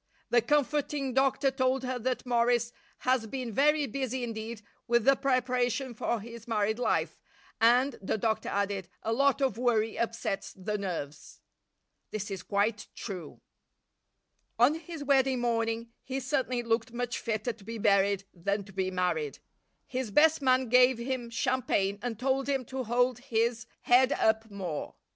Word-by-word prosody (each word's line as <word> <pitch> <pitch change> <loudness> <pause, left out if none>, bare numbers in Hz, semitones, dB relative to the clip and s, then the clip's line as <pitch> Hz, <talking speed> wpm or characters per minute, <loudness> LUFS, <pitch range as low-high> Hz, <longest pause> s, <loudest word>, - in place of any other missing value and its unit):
The 240 - +5
comforting 285 +1 0
doctor 270 +1 +2
told 260 0 +1
her 255 -1 -2
that 255 +2 -2
Morris 240 -1 +2 0.3
has 255 -3 +1
been 250 0 -4
very 295 +4 +3
busy 260 0 -3
indeed 225 -1 -5 0.2
with 235 -1 +2
the 275 0 +6
preparation 255 -1 0
for 230 +1 -1
his 230 +2 -10
married 220 0 0
life 245 - 0 0.4
and, 245 +3 +4
the 195 - -1
doctor 220 +1 -1
added, 200 -2 -2
a 225 - 0
lot 275 +3 +2
of 265 -4 +1
worry 225 -3 +1
upsets 230 -4 -2
the 195 +3 -4
nerves. 165 -7 -5 0.7
This 205 -1 -4
is 190 -2 -4
quite 205 +3 0
true. 180 -8 -7 1.2
On 245 +5 +5
his 325 -1 -7
wedding 265 -2 +3
morning 230 -1 -1
he 265 +1 -4
certainly 255 -2 -1
looked 230 +1 0
much 245 0 -3
fitter 225 +1 -2
to 210 - -18
be 230 +3 -6
buried 200 -2 +3
than 200 +4 -2
to 195 0 -15
be 190 0 -1
married. 175 -6 -1 0.5
His 255 -3 -3
best 300 +8 +4
man 255 -2 +3
gave 250 +1 +6
him 240 0 -3
champagne 205 -5 0
and 235 -3 -3
told 270 +3 0
him 270 -2 0
to 260 -1 -2
hold 245 +1 +1
his 235 -2 -1
head 255 +3 +5
up 220 -2 +1
more. 185 -7 -5
235 Hz, 155 wpm, -29 LUFS, 215-260 Hz, 1.2 s, the